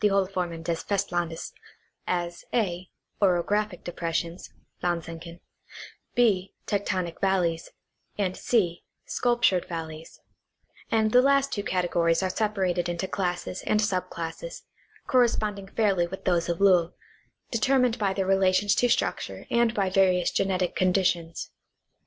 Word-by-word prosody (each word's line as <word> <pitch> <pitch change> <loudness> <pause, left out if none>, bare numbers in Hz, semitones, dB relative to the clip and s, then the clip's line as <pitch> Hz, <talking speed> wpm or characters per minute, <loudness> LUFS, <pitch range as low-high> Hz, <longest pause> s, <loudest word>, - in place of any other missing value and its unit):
Hohlformen 185 -4 0
des 165 0 -1
Festlandes) 175 -5 -2 0.6
as 175 -1 -2
(a) 185 -5 -1 0.3
orographic 200 +1 +1
depressions 170 0 -3 0.3
(Landsenken); 170 -1 -4 0.8
{b) 200 -6 +2
tectonic 185 -4 -2
valleys, 180 -4 +1 0.5
and 190 -3 0
(c) 180 -8 0 0.2
sculptured 240 -7 +2
valleys; 165 -2 -7 0.7
and 220 -1 +2
the 250 - +7
last 275 +1 +3
two 205 - -1
categories 175 -2 +1
are 185 - 0
separated 185 -5 0
into 175 +2 -2
classes 180 -1 -3
and 215 - +3
sub 195 -4 0
classes, 170 - -6 0.4
corresponding 215 -6 +1
fairly 195 -5 +1
with 190 +2 -8
those 175 -2 +1
of 170 - -1
Lowl, 180 -4 +4 0.6
determined 250 +1 +2
by 200 -2 +1
their 190 0 -1
relations 195 +1 +3
to 245 - +2
structure 235 - -1
and 235 -1 +3
by 195 -2 +1
various 185 -2 +3
genetic 185 -2 0
conditions. 180 -3 0
185 Hz, 120 wpm, -26 LUFS, 175-205 Hz, 0.8 s, the